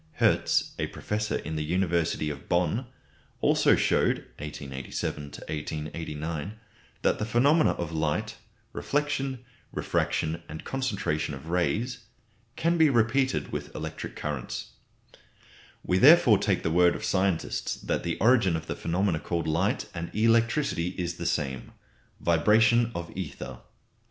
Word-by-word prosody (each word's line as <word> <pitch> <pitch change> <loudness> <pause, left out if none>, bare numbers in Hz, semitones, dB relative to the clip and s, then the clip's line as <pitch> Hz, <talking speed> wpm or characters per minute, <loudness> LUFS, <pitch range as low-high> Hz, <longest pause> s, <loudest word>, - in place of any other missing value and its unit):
Hertz, - - +2
a - - 0
professor 105 0 -3
in 80 +1 -4
the 75 - -1
university 85 -2 0
of 70 -1 -10
Bonn, 90 +8 +1 0.5
also - - +4
showed - - +1
(1887 70 0 -5
1889) 80 +4 -5 0.4
that - - +2
the - - -1
phenomena 140 +9 +3
of 85 -2 -4
light 80 +8 -1 0.4
reflection, 135 -3 -1 0.3
refraction, 80 +2 -1
and 80 +1 -7
concentration 100 - -2
of 70 +5 -10
rays 105 +8 0 0.6
can 170 +1 +1
be 160 -2 +6
repeated 130 +2 +1
with - - -5
electric - - -6
currents. 75 -4 -4 1.1
We 90 0 +2
therefore 130 - +7
take - - 0
the 80 - 0
word 90 +1 +4
of 110 - -5
scientists 95 -4 0
that - - -2
the 85 - -2
origin 110 -6 +4
of 80 0 -4
the - - -4
phenomena 90 -1 0
called 85 -1 -2
light 85 +6 0
and 85 0 -5
electricity 115 - +2
is 85 -2 -3
the 85 - -3
same 70 -6 -2 0.5
vibration 110 +7 +4
of 85 0 -6
ether. 70 -8 -6
90 Hz, 130 wpm, -27 LUFS, 80-115 Hz, 1.1 s, therefore